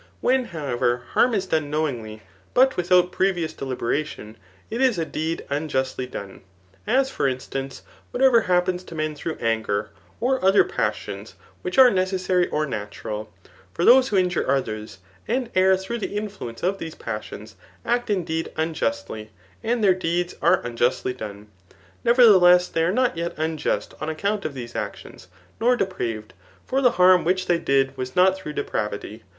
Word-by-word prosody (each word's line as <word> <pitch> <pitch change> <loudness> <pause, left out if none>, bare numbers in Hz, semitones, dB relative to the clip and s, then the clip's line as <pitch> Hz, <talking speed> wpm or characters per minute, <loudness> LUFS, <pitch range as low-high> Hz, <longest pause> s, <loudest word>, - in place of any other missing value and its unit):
When, 260 0 +2
however, 125 - -1
harm 245 -2 +3
is 195 -2 0
done 155 -5 -1
knowingly, 120 -9 -3 0.3
but 260 +1 +5
without 180 0 +3
previous 180 -5 0
deliberation, 130 -3 -3 0.4
it 235 +3 -2
is 255 -6 +3
a 165 - -1
deed 160 +2 -3
unjustly 135 -3 -2
done; 100 -6 -8 0.5
as 265 +4 +2
for 140 - 0
instancy 135 +1 -4 0.3
whatever 250 -2 +4
happens 180 -1 +1
to 165 - -10
men 155 -1 -2
through 155 +2 -5
anger, 110 -2 -1 0.3
or 260 0 0
other 195 +2 +6
pas 395 - -1
sions - - -9 0.3
which 370 -6 -4
are 260 -2 +8
necessary 185 -1 +1
or 155 0 -1
natural. 105 -2 -6 0.4
For 170 - 0
those 255 +2 +7
who 205 - 0
injure 180 -1 +1
others, 110 -7 -2 0.3
and 245 0 -1
err 190 0 +4
through 190 +5 -5
the 205 -1 -4
influence 205 - -6
of 195 +2 0
these 160 -1 -6
pas 110 -2 -4
isions, 105 +1 -10 0.3
act 240 0 0
indeed 165 -5 -1
unjustly, 115 -9 -2 0.3
and 235 -1 0
their 195 -2 +6
deeds 175 0 -1
are 170 +4 +3
unju^y 120 +1 0
done 105 -3 -8 0.3
} 95 -1 -30
nevertheless 185 -7 +6
they 165 - -1
are 170 - +2
not 250 -3 +1
yet 170 0 -3
unjust 160 0 -2
on 155 - -2
account 200 +6 -2
of 150 -3 -4
these 120 -2 -7
actions, 95 - -6 0.3
nor 245 +2 +3
depraved; 115 - -3 0.3
for 265 +1 0
the 250 -2 +4
harm 180 0 +6
which 185 +2 +1
they 175 -1 +2
did 135 -2 +1
was 130 -1 -5
not 185 +1 +5
through 170 -6 -7
depravity. 105 -3 -4
165 Hz, 165 wpm, -23 LUFS, 130-195 Hz, 0.5 s, are